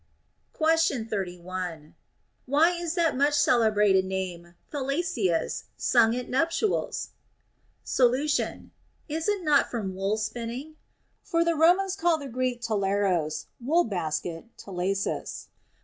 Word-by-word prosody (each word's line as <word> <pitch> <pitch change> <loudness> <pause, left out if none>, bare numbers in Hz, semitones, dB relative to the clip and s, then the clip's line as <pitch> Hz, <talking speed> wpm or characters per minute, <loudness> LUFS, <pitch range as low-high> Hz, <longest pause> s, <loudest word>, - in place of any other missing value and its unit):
Question 315 -7 +2
31. 180 -5 -5 0.5
Why 300 +6 +4
is 345 -1 -3
that 335 -2 +3
so - - -7
much 285 +2 +3
celebrated 210 -8 +4
name 180 -2 -5 0.2
Thalassius 275 - -1
sung 230 -2 +3
at 250 0 -4
nuptials? 330 - 0 0.7
Solution. 265 +4 +1 0.4
Is 320 +1 -3
it 405 -3 0
not 295 -3 +3
from 205 -6 -3
wool 195 +3 -1
spinning1? 235 +7 -5 0.5
For 335 -2 0
the 335 - +2
Ro 325 +3 +6
mans 390 0 -2
call 345 -3 +2
the 285 -2 -7
Greek 250 -1 -2
τάλαρος 195 -7 0 0.2
(wool 325 +7 +3
basket) 165 -4 -3
talasus. 195 +1 -3
240 Hz, 115 wpm, -27 LUFS, 190-315 Hz, 0.7 s, Ro